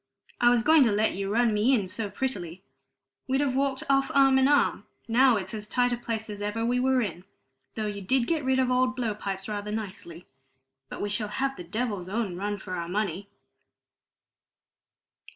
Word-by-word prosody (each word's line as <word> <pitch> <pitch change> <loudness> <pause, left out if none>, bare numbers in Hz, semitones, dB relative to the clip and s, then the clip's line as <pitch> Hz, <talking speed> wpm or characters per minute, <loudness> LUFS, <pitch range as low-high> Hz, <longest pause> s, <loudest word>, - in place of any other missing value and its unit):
I 240 - +5
was 240 -2 +3
going 315 +3 +6
to 230 - +2
let 210 +2 +1
you 195 +1 -3
run 230 0 +2
me 220 +6 +3
in 205 -6 -1
so 210 +2 -3
prettily! 190 -6 -4 0.6
We'd 265 +1 +1
have 280 -3 0
walked 270 -1 0
off 275 0 +2
arm 270 -1 +5
in 265 - +4
arm; 285 -1 +2 0.2
now 245 +1 +4
it's 190 0 -5
as 210 -1 -5
tight 245 +2 +1
a - - -1
place 230 -2 -4
as 205 -1 -7
ever 210 +2 -2
we 245 +1 +1
were 260 0 +2
in, 180 -3 -5 0.5
though 220 - -2
you 205 -1 -4
did 240 +6 +1
get 320 0 -1
rid 260 0 +1
of 255 -1 +2
old 255 0 +2
blow 235 -4 -1
pipes 195 -2 -5
rather 210 -1 -4
nicely. 190 -5 -6 0.6
But - - -6
we 205 - -2
shall 210 0 -1
have 270 +6 -2
the 180 - -8
devil's 200 -1 -3
own 210 -3 -2
run 205 +3 -3
for 190 -1 -8
our 170 -1 -4
money!" 200 0 -2
220 Hz, 200 wpm, -27 LUFS, 200-255 Hz, 0.6 s, going